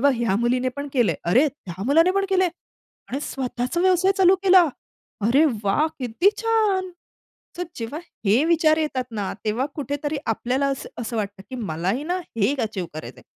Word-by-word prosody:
बघ 280 +1 +4
ह्या 230 -4 +1
मुलीने 250 +3 +1
पण 285 0 -4
केलंय. 245 -5 +3
अरे 245 - +4
त्या 190 - -9
मुलाने 330 +6 +5
पण 395 0 +1
केलंय. 375 -1 +3 0.6
आणि 275 +3 -2
स्वतःचा 255 +4 -3
व्यवसाय 370 +1 +4
चालू 375 0 +6
केला. 370 -2 +7 0.6
अरे 275 +7 +5 0.2
वाह! 250 +11 +2
किती 255 - +2
छान! 425 -5 +1 0.7
तर 355 - -1
जेव्हा 235 +7 -5 0.3
हे 220 +9 +4
विचार 320 -2 +4
येतात 295 -5 -1
ना 205 -3 -3
तेव्हा 230 +5 0
कुठेतरी 290 +1 -3
आपल्याला 255 +5 0
असं 275 -1 -3
असं 230 0 -4
वाटतं 200 -2 -4
की 260 - -6
मलाही 195 - -2
ना 355 +4 -1
हे 230 - -2
एक 285 - -4
अचीव्ह 205 -6 -3
करायचंय. 155 - -8
270 Hz, 170 wpm, -23 LUFS, 225-335 Hz, 0.7 s, केला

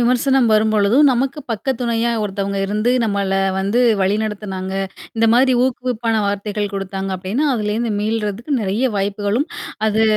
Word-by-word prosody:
விமர்சனம் 250 +1 +3
வரும்பொழுதும், 215 +4 +4
நமக்கு 265 +4 -1
பக்க 225 +2 -4
துணையா 235 -1 0
ஒருத்தவங்க 200 -1 -2
இருந்து 210 +4 0
நம்மள 200 -3 -1 0.3
வந்து 200 +5 +1 0.2
வழிநடத்துனாங்க. 195 -1 -2 0.4
இந்த 225 0 +3
மாதிரி 260 +2 +4
ஊக்குவிப்பான 245 -3 -1
வார்த்தைகள் 205 0 -2
குடுத்தாங்க 195 0 -4
அப்படின்னா, 200 +11 -1
அதுலருந்து 220 +1 -1
மீள்றதுக்கு 220 +4 -2
நெறைய 215 +6 0
வாய்ப்புகளும், 205 - -1 0.4
அது 220 +1 +1
215 Hz, 125 wpm, -19 LUFS, 200-240 Hz, 0.4 s, வரும்பொழுதும்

